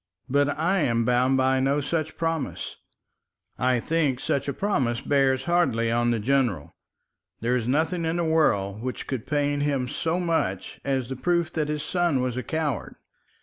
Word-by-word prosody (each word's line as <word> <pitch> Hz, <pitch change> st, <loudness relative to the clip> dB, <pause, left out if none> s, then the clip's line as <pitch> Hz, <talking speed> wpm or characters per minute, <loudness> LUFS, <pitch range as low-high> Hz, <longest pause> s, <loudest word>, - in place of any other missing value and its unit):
But 145 Hz, +2 st, +1 dB
I 175 Hz, +5 st, +2 dB
am 115 Hz, -6 st, +1 dB
bound 125 Hz, +2 st, +3 dB
by 130 Hz, 0 st, +3 dB
no 135 Hz, +2 st, +2 dB, 0.4 s
promise. 165 Hz, -3 st, -3 dB, 0.8 s
I 125 Hz, -1 st, +2 dB
think 145 Hz, -2 st, 0 dB
such 135 Hz, +1 st, -1 dB
a -, -, 0 dB
promise 130 Hz, -, 0 dB
bears 135 Hz, -2 st, +2 dB
hardly 130 Hz, -10 st, +1 dB
on 120 Hz, +1 st, +2 dB
the 120 Hz, -, +2 dB
general. 120 Hz, -, 0 dB, 0.7 s
There 120 Hz, +2 st, +1 dB
is 120 Hz, -2 st, -1 dB
nothing 160 Hz, +6 st, +1 dB
in 160 Hz, +1 st, 0 dB
the 175 Hz, -, 0 dB
world 105 Hz, -11 st, +1 dB
which 130 Hz, +1 st, -4 dB
could 130 Hz, -5 st, -4 dB
pain 145 Hz, -1 st, 0 dB
him 140 Hz, -3 st, 0 dB
so 165 Hz, +7 st, -1 dB
much 160 Hz, -, -2 dB
as 135 Hz, -3 st, -1 dB
the 130 Hz, -, -3 dB
proof 170 Hz, +5 st, 0 dB
that 155 Hz, -2 st, 0 dB
his 150 Hz, -1 st, -2 dB
son 175 Hz, -4 st, +1 dB
was 125 Hz, -1 st, -1 dB
a 130 Hz, -, -2 dB
coward. 150 Hz, -, -3 dB
135 Hz, 170 wpm, -25 LUFS, 125-160 Hz, 0.8 s, bound